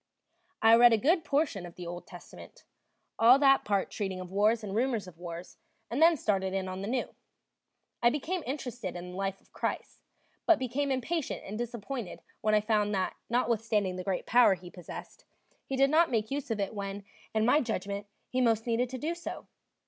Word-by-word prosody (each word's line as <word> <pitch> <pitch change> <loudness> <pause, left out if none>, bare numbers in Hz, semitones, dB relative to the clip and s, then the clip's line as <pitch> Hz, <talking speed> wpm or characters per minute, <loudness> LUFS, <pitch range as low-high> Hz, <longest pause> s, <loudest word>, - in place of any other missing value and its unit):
I 225 0 +7
read 240 0 +7
a - - +5
good 320 - +2
portion 280 - 0
of 175 -1 -10
the 180 - -8
Old 175 +1 -7
Testament, 175 - -13 0.5
all 240 +3 +8
that 275 -1 +5
part 200 -2 0
treating 190 -3 -3
of 185 0 -8
wars 215 +3 +2
and 200 -2 -5
rumors 235 -3 0
of 170 -2 -13
wars, 175 0 -8 0.3
and 255 +6 -1
then 330 0 +6
started 190 -5 0
in 190 -1 -1
on 185 0 -5
the 200 - -4
New. 250 +2 -2 0.9
I 240 - +6
became 315 +7 -2
interested 245 -8 -4
in 180 +1 -7
the - - -9
life 195 0 -2
of - - -30
Christ, - - -4 0.5
but 335 - +6
became 270 +2 -1
impatient 270 +4 -2
and 200 - -6
disappointed 235 -2 -5 0.2
when 215 0 +3
I 210 - +4
found 210 -1 +1
that, 185 -1 -1
notwithstanding 225 -5 +1
the 185 - -5
great 190 -1 -2
power 240 -4 +5
he 175 0 -12
possessed, 180 -3 -10 0.4
he 270 - -2
did 275 +1 +4
not 330 +2 +5
make 220 -1 -1
use 280 -1 -3
of 225 -2 -1
it 200 +1 -2
when, 200 -1 -5 0.3
in 220 0 +3
my 290 +6 +4
judgment, 200 -3 -3 0.2
he 255 - -1
most 225 -2 +2
needed 240 +1 0
to 260 - -5
do 310 +6 -2
so. 340 0 -7
220 Hz, 200 wpm, -30 LUFS, 195-255 Hz, 0.9 s, all